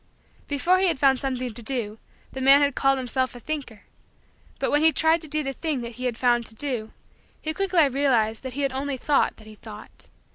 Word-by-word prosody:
Before 340 +6 +2
he 380 - +3
had 335 - +1
found 265 -1 +3
something 255 -3 -3
to 235 - -10
do 225 -3 -1 0.3
the 265 - -6
man 275 +2 +7
had 285 -1 +2
called 270 +1 +2
himself 260 0 -2
a - - -9
thinker. 250 -6 -6 0.7
But - - -1
when 295 - +3
he 320 +1 +5
tried 320 +3 +2
to 315 - -10
do 305 +1 -2
the 270 -1 -3
thing 300 -3 -3
that 235 -1 -8
he - - -2
had 240 -3 -2
found 240 -2 +2
to 220 - -8
do, 235 -4 -2 0.5
he 315 - -3
quickly 365 -4 +2
realized 245 -5 +1
that 260 -1 -7
he 285 - -4
had 270 -1 -1
only 270 0 -3
thought 285 +2 +1
that 220 - -15
he 215 - -12
thought. 215 0 -12
265 Hz, 225 wpm, -24 LUFS, 240-290 Hz, 0.7 s, man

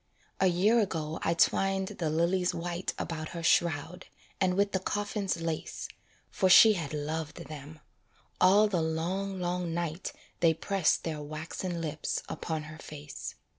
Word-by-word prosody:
A 190 - +4
year 195 +7 +4
ago 160 -7 -1
I 170 - +1
twined 195 +2 +2
the 165 -3 -2
lilies 175 +3 +1
white 175 +1 -3
About 155 -2 -4
her 165 - -5
shroud, 170 +2 +1 0.3
and 185 -2 +2
with 200 0 +2
the 190 - 0
coffin's 205 -1 -2
lace, 165 -1 -3 0.4
For 190 - +2
she 215 +4 +9
had 165 -7 -4
loved 155 +1 -4
them; 150 +1 -9 0.6
all 200 +4 +6
the 185 -5 0
long, 180 +5 -2
long 175 -1 -2
night 170 +1 -3 0.3
They 165 -2 +4
press 190 +1 +2
their 155 -2 -4
waxen 165 +4 -4
lips 155 -1 -3
upon 160 -2 -3
her 155 +1 -10
face. 145 -1 -8
170 Hz, 150 wpm, -30 LUFS, 155-190 Hz, 0.6 s, she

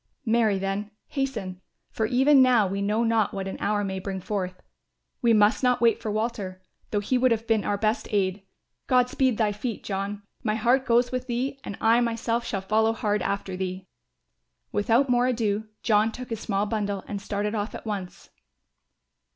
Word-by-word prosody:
"Marry 220 -3 +3
then, 195 +2 -2 0.2
hasten; 215 -10 -3 0.3
for, 220 - -1
even 265 +3 +5
now 250 -5 +5
we 195 +1 -2
know 210 +3 +1
not 225 -3 +1
what 195 -1 -3
an 190 - -5
hour 205 0 0
may 190 -1 -3
bring 190 0 -4
forth. 185 -1 -3 0.6
We 235 - +4
must 210 +2 +4
not 250 -2 +3
wait 230 -1 +3
for 225 - -3
Walter, 210 -4 -3 0.3
though 205 - 0
he 250 +5 +1
would 255 +1 +4
have 225 -1 0
been 225 -3 +2
our 205 - 0
best 215 +3 0
aid. 195 -2 0 0.5
God 250 -1 +4
speed 260 -4 +1
thy 215 -2 +2
feet, 215 +2 -4
John; 200 +1 -3 0.2
my 215 -1 0
heart 245 +4 +2
goes 240 +1 +3
with 255 0 -3
thee 255 +3 -2
and 200 - -6
I 230 +2 +4
myself 230 0 0
shall 195 -5 -2
follow 220 +3 +2
hard 210 -3 0
after 195 0 -2
thee." 185 0 -4 0.9
Without 230 +6 +2
more 245 0 +3
ado 220 -3 0 0.2
John 215 0 +3
took 250 +1 -8
his 225 - -2
small 200 -2 -1
bundle 205 -3 -2
and 200 -1 -4
started 205 +1 -2
off 210 0 -3
at - - -9
once. 200 -4 -6
215 Hz, 185 wpm, -26 LUFS, 200-235 Hz, 0.9 s, even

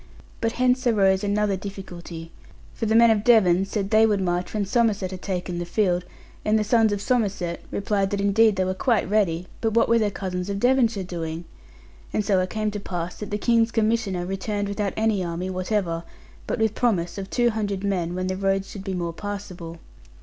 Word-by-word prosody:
But 230 0 0
hence 255 0 +2
arose 195 -3 +3
another 205 0 +1
difficulty; 175 -4 -8 0.4
for 225 - -3
the 220 - +2
men 230 0 +7
of 210 -2 +1
Devon 195 -6 +5
said 200 0 -3
they 220 0 +6
would 205 -2 +1
march 180 -1 -1
when 210 -2 -1
Somerset 205 -3 +1
had 185 -1 -7
taken 180 -2 -3
the - - -2
field; 180 -1 +1 0.4
and 215 +1 +3
the 215 - +1
sons 225 0 +3
of 205 - -1
Somerset 200 -8 0
replied 200 -1 0
that 200 - -2
indeed 205 +2 +4
they 185 0 +1
were 185 - 0
quite 230 +3 +1
ready, 185 -4 +1 0.2
but 225 -1 0
what 230 - +4
were 230 0 +4
their 215 -2 +2
cousins 185 -1 -4
of 200 0 -2
Devonshire 235 -4 +2
doing? 170 -2 -5 0.7
And 210 - -1
so 195 -2 +3
it 185 0 -1
came 215 -1 -1
to 205 - -4
pass 175 -3 -5
that 210 - -6
the 205 - -1
King's 230 +1 +3
Commissioner 220 -5 0
returned 200 +2 -2
without 200 -1 -2
any 215 -3 +1
army 175 +2 -3
whatever; 185 -2 -1 0.5
but - - -1
with 220 -2 +1
promise 195 -7 0
of 195 - -6
two 240 -1 +2
hundred 205 -3 -2
men 180 -4 -1
when 185 0 -2
the 185 0 -1
roads 195 0 0
should 200 - -7
be 195 -1 -3
more 170 -2 -3
passable. 180 -4 -6
200 Hz, 205 wpm, -24 LUFS, 185-220 Hz, 0.7 s, men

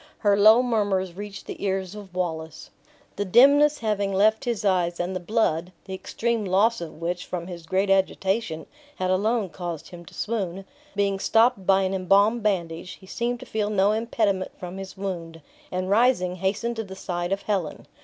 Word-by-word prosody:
Her 205 -2 +3
low 215 +4 +7
murmurs 205 -6 0
reached 205 +2 -8
the - - -7
ears 190 -1 -1
of 200 -4 -11
Wallace. 160 -3 -4 0.5
The 205 - 0
dimness 285 +9 +6
having 205 -3 -1
left 215 +3 +3
his 230 -4 -2
eyes, 175 -3 +1
and 180 +2 -2
the - - -1
blood 180 -3 0
(the 190 - -7
extreme 230 +4 -2
loss 205 +4 +2
of 160 -2 -8
which, 175 +1 -2
from 175 -2 -4
his 170 -2 -9
great 190 +2 +1
agitation, 190 -2 0 0.3
had 185 0 -1
alone 210 +2 +1
caused 175 -3 -6
him 175 -1 -10
to - - -14
swoon), 195 -4 -3 0.3
being 200 -1 +1
stopped 225 -2 +3
by 195 0 +5
an 190 0 -1
embalmed 200 +5 +3
bandage, 175 -4 -2
he - - -15
seemed 240 +5 -2
to - - -8
feel 215 -3 -2
no 200 -1 +3
impediment 215 -4 0
from 180 +1 -7
his 190 0 -8
wound; 170 -4 -5 0.3
and 185 +1 -2
rising, 205 -5 +3
hastened 205 +5 -1
to 225 - -2
the 190 -2 -9
side 175 -1 -3
of 195 0 -1
Helen. 190 -7 -2
195 Hz, 185 wpm, -25 LUFS, 180-215 Hz, 0.5 s, low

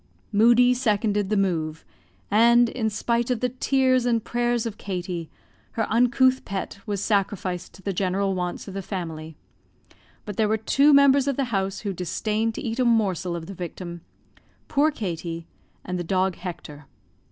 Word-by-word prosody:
Moodie 240 +4 +5
seconded 210 -5 0
the 210 - +1
move; 160 -5 -1 0.5
and, 235 +3 +5
in 225 -3 -1
spite 235 +3 -1
of 250 -3 0
the 250 - 0
tears 255 0 +2
and 230 -2 +1
prayers 240 0 0
of 225 -2 -5
Katie, 175 -3 -4 0.4
her 225 - 0
uncouth 250 +2 +3
pet 195 0 -5
was 205 -1 -2
sacrificed 195 -3 -1
to 190 - -16
the 195 - -2
general 195 +1 0
wants 180 +1 -4
of 195 - -7
the 195 - -4
family; 160 -5 -6 0.9
but 205 -2 -6
there 220 - +3
were 220 - +2
two 275 +7 +3
members 280 -1 +5
of 280 - +1
the 275 - +1
house 195 0 -1
who 200 -2 -3
disdained 215 +5 -2
to - - -5
eat 230 +2 -3
a - - +4
morsel 190 -7 +1
of 165 -1 -6
the 195 - -8
victim; 175 -1 -7 0.7
poor 295 +2 +3
Katie 170 - -5 0.4
and 180 0 -3
the - - -2
dog 185 +1 0
Hector. 150 -5 -8
205 Hz, 170 wpm, -24 LUFS, 180-235 Hz, 0.9 s, Moodie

